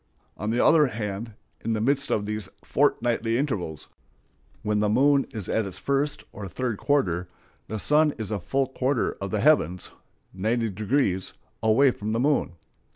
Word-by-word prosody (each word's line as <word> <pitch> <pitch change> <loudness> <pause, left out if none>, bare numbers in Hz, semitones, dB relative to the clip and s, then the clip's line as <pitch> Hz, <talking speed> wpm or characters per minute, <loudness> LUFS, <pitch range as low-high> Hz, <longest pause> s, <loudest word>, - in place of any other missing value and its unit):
On 105 - -4
the 120 +2 +2
other 155 -3 +6
hand, 110 -1 -4 0.3
in 115 - 0
the 110 - -1
midst 140 +5 +1
of 105 - 0
these 105 0 -4
fortnightly 115 -1 +1
intervals, 100 - -3 0.8
when 105 0 +1
the 105 0 +2
moon 140 +5 +4
is 105 -5 -6
at 110 -2 0
its 95 -1 -7
first 140 +6 -1
or 100 -1 -7
third 120 +1 -3
quarter, 90 - +1 0.4
the 110 - -4
sun 150 +8 +4
is 110 -3 -5
a 105 - -1
full 135 +9 0
quarter 130 0 0
of 100 - -3
the 105 0 -1
heavens 90 - +2 0.4
(90°) 110 0 0 0.3
away 115 +5 +4
from 110 -2 -4
the 115 - 0
moon. 140 - +1
110 Hz, 160 wpm, -26 LUFS, 105-135 Hz, 0.8 s, other